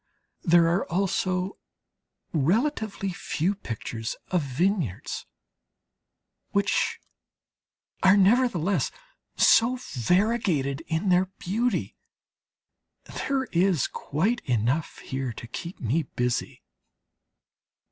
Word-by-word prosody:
There 170 -1 +5
are 175 +3 +2
also 185 +1 0 0.7
relatively 200 - 0
few 175 +2 -1
pictures 115 - -5 0.2
of 180 -2 +2
vineyards, 145 - -1 1.3
which 200 0 +1 1.0
are 190 +2 +6
nevertheless 200 -3 +3 0.5
so 235 +3 +5 0.2
variegated 165 - +1
in 165 +4 0
their 180 +1 +4
beauty. 225 +7 -1 1.1
There 275 -1 -2
is 175 -3 +3
quite 200 - -1
enough 125 +5 0
here 130 -1 -3
to 115 - -9
keep 170 +9 -7
me 130 +8 +1
busy. 125 -4 -2
180 Hz, 85 wpm, -26 LUFS, 140-200 Hz, 1.3 s, are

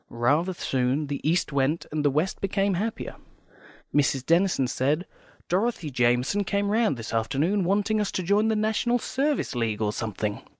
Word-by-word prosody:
Rather 145 +10 +1
soon 130 0 0
the 140 -1 -4
East 160 -1 +1
went, 140 +4 +1
and 150 -1 -1
the 145 - +4
West 155 +7 -1
became 195 0 +1
happier. 215 +6 -3 0.8
Miss 145 -1 +3
Denison 170 -2 +2
said, 140 +7 0 0.4
"Dorothy 185 -4 0
Jamison 125 +10 +2
came 200 +1 0
round 220 - +2
this 115 -1 -7
afternoon, 145 - +1
wanting 205 +4 +1
us 205 - -1
to 185 - -1
join 205 +5 +2
the 220 - +2
National 220 +3 +1
Service 280 +4 -1
League 115 -4 -1
or 105 -1 0
something." 105 -1 -3
165 Hz, 165 wpm, -26 LUFS, 130-200 Hz, 0.8 s, the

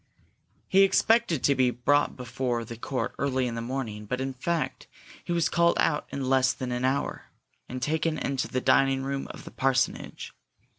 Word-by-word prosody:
He 195 - +5
expected 195 - +3
to 140 - +4
be 130 -2 +3
brought 145 +4 +1
before 125 -1 -2
the 115 - -7
court 130 +3 -3
early 130 -2 +1
in 120 - -2
the 115 - -3
morning 115 -4 -4
but, 125 +4 -2
in 135 0 -2
fact, 165 +5 -2 0.4
he - - -5
was 170 -2 +2
called 170 0 +3
out 150 -1 +1
in 135 -2 -4
less 130 -1 +3
than 125 0 -5
an 125 +1 -2
hour, 135 +2 -1 0.4
and 130 0 -5
taken 160 +2 0
into 135 -2 -2
the 130 - -2
dining 135 0 +3
room 135 0 -3
of - - -9
the - - -10
parsonage. 130 -1 -1
130 Hz, 185 wpm, -27 LUFS, 125-145 Hz, 0.4 s, He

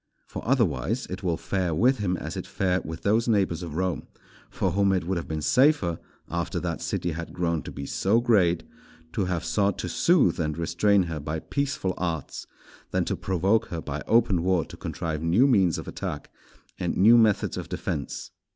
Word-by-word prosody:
For, - - -7
otherwise, 115 +5 +1
it 95 - -5
will 85 -4 0
fare 90 -1 -1
with 125 - +3
him 90 -3 0
as - - -6
it - - -5
fared 95 -1 0
with 80 +1 -7
those 110 +4 +2
neighbours 95 -6 +1
of 85 -4 -6
Rome, 90 0 -2 0.4
for 95 - -1
whom 100 +1 +2
it 95 - 0
would 95 +2 -1
have 85 - -4
been 80 -1 -3
safer, 125 - +3 0.3
after 85 -1 -2
that - - -3
city 85 - -2
had 80 0 -6
grown 85 -3 0
to - - -8
be 70 - -6
so 100 +10 +2
great, 95 -8 +3 0.5
to 100 - 0
have 90 -2 -2
sought 100 +4 +1
to - - -3
soothe 135 - +3
and 75 -1 -1
restrain 90 +4 +2
her 80 -3 -4
by 75 +2 -3
peaceful 140 - -2
arts, 85 -5 -3 0.4
than - - 0
to - - -1
provoke 95 +5 +1
her 85 - -4
by 75 -2 -5
open 110 -6 +3
war 90 -2 +1
to - - -11
contrive 80 -2 -4
new 85 +11 +4
means 95 - +3
of - - -7
attack - - -5 0.5
and - - -1
new 110 +5 +7
methods 110 -3 +3
of - - -6
defence. - - -4
90 Hz, 195 wpm, -26 LUFS, 85-105 Hz, 0.5 s, new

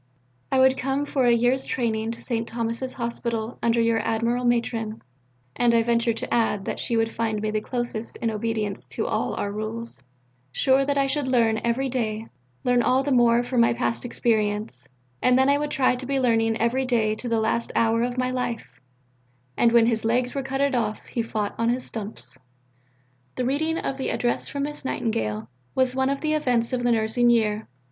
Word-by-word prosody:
I 265 - +2
would 260 0 +4
come 270 +2 -1
for 270 -3 0
a - - +6
year's 245 +3 +2
training 225 -3 -1
to - - -5
St. 230 -2 -1
Thomas's 230 +2 -2
Hospital 235 -1 -3
under 235 0 +2
your 230 -1 +2
admirable 230 +3 0
Matron 230 -2 -1 0.6
(and 240 -1 +3
I 230 - +4
venture 235 0 +2
to 225 - -4
add 210 -4 +1
that - - -3
she 235 - 0
would 225 0 0
find 220 -2 -1
me 215 0 -2
the 215 0 -1
closest 240 -1 -4
in 230 -1 -1
obedience 215 -2 -3
to - - -3
all - - -1
our 200 - -2
rules), 215 - -5 0.5
sure 270 - +3
that 285 0 0
I 275 - +3
should 275 0 0
learn 230 -4 +2
every 235 +3 0
day, 225 -4 -2 0.4
learn 245 -1 +3
all 260 +3 +2
the 285 - -1
more 240 -1 +4
for 245 0 -1
my 230 0 +4
past 235 -1 -1
experience, 210 - -1 0.3
and 250 0 +4
then 265 +1 +4
I 285 0 +3
would 295 0 -2
try 260 -3 +2
to 255 +1 -6
be 275 0 +1
learning 225 -3 +2
every 235 +4 +1
day 225 -4 +1
to 245 - -5
the 230 -1 +2
last 225 +1 0
hour 230 0 +3
of 245 +1 -1
my 255 0 0
life 235 - -4 0.7
'And 235 - +3
when 235 -1 +5
his 225 -1 +1
legs 245 +2 +1
were 275 - -2
cuttit 270 +1 0
off, 220 -4 -1
He 235 - -3
fought 215 -2 -2
upon 230 +1 -1
his 250 +1 0
stumps.'" 200 - -7 1.0
The 250 - -1
reading 315 +5 0
of 270 - -3
the 265 - -1
"Address 240 -1 -1
from 280 -1 -3
Miss 295 +1 -5
Nightingale" 110 - -2 0.3
was 260 -1 +2
one 265 0 +1
of 275 0 -2
the 310 0 0
events 250 -5 +1
of 250 - 0
the 245 0 +2
nursing 230 +2 +2
year. 220 -2 +1
235 Hz, 200 wpm, -24 LUFS, 225-255 Hz, 1.0 s, a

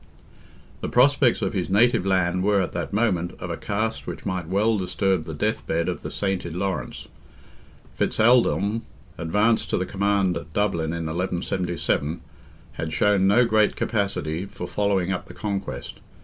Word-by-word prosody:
The - - -3
prospects 130 -1 +4
of - - -1
his 95 -3 -2
native 105 -1 +3
land 90 -1 +2
were, 100 0 +3
at 95 - -1
that 85 -2 -3
moment, 95 -5 0
of - - -5
a - - -2
cast 110 +2 -3
which - - -6
might 90 -3 -2
well 105 +5 +2
disturb 95 -2 0
the 80 - -6
death 105 +8 -1
bed 85 +1 0
of - - -3
the - - -5
sainted 95 -4 -2
Laurence. 90 -9 -3 0.9
Fitz - - -1
Aldelm, 115 -2 +3 0.4
advanced 105 +7 +1
to - - +1
the 90 - -1
command 100 -2 +1
at 80 +2 -9
Dublin 85 -6 0
in 85 -1 -3
1177, 85 -2 -1 0.5
had 80 - -5
shown 95 +4 +3
no 120 +5 +5
great 110 -2 +3
capacity 100 -6 -1
for 90 - -7
following 95 -1 0
up 90 - -3
the - - -11
conquest. 100 - -4
95 Hz, 165 wpm, -24 LUFS, 85-105 Hz, 0.9 s, no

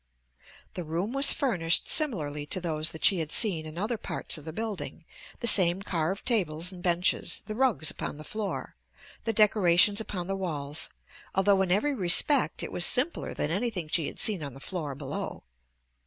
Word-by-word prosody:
The 180 - -5
room 170 +8 -3
was 275 +1 +6
furnished 175 -11 +2
similarly 150 - 0
to 185 - +1
those 160 -2 -1
that 160 - -2
she 190 - +4
had 160 -1 -3
seen 170 -9 +3
in 155 +1 -10
other 215 +4 -2
parts - - -3
of 155 - -7
the 160 - -6
building, 185 -5 -6 0.4
the - - -2
same 190 -3 +5
carved 180 +1 -2
tables 180 -7 0
and 180 -2 -11
benches, 175 +1 +1
the 215 - -5
rugs 225 - +1
upon - - -6
the 155 - -9
floor, 210 +6 -5 0.5
the 225 - +1
decorations 205 -1 +4
upon 185 -5 -5
the 195 +2 -3
walls, 150 -5 -4 0.5
although 195 0 +3
in 185 -2 0
every 250 +10 +2
respect 230 - +3
it - - -6
was 175 - +1
simpler 265 - +1
than 150 - -2
anything 195 -4 -2
she 160 -1 0
had - - -8
seen 205 -6 +2
on 140 -3 -7
the - - -11
floor 150 -3 -5
below. 140 -1 -6
180 Hz, 185 wpm, -28 LUFS, 160-210 Hz, 0.5 s, was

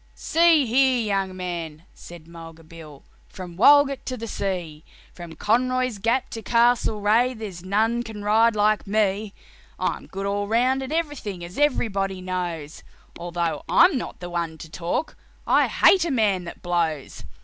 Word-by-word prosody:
"See 330 -3 +3
here, 255 +1 +3
young 195 -4 -2
man," 170 -4 -6
said 170 -2 -13
Mulga 165 -1 -12
Bill, 155 -3 -13 0.2
"from 180 -3 -10
Walgett 280 +6 +5
to 255 - -3
the 230 - -6
sea, 175 -8 -4 0.3
From 170 -2 -10
Conroy's 255 0 0
Gap 235 +5 0
to 225 - -6
Castlereagh, 235 +1 +2
there's 195 -6 -8
none 220 +5 0
can 220 -3 -8
ride 220 +2 +3
like 210 0 +1
me. 205 0 0 0.4
I'm - - -3
good 195 +1 -6
all 200 0 -2
round 250 +5 +1
at 265 - -6
everything, 290 - -3
as 175 +9 -8
everybody 195 -10 0
knows, 175 -4 -5 0.4
Although 170 -1 -3
I'm 345 -1 +5
not 250 - -5
the 175 - -6
one 170 -2 -3
to 160 -1 -11
talk 175 - -3 0.3
I - - +3
hate 375 -3 +4
a 340 - -2
man 210 - +1
that 170 - -10
blows. 165 -5 -2
205 Hz, 155 wpm, -23 LUFS, 175-240 Hz, 0.4 s, Walgett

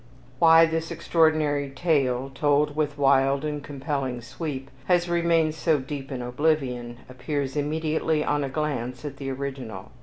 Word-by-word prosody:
Why 165 0 +7
this 165 0 -2
extraordinary 155 -4 +1
tale, 135 -3 0
told 145 +1 +2
with 150 -2 -1
wild 135 0 +3
and 150 -1 -3
compelling 140 -3 -3
sweep, 135 +2 -6
has 175 -1 +2
remained 170 -2 +2
so 160 0 +1
deep 135 0 -6
in 125 -2 -4
oblivion, 125 -3 -1
appears 135 +2 -3
immediately 155 +1 0
on 145 -1 +1
a 135 - -2
glance 130 -3 -3
at 140 -2 -6
the 135 -1 -5
original. 135 -3 -6
145 Hz, 145 wpm, -25 LUFS, 135-155 Hz, -, Why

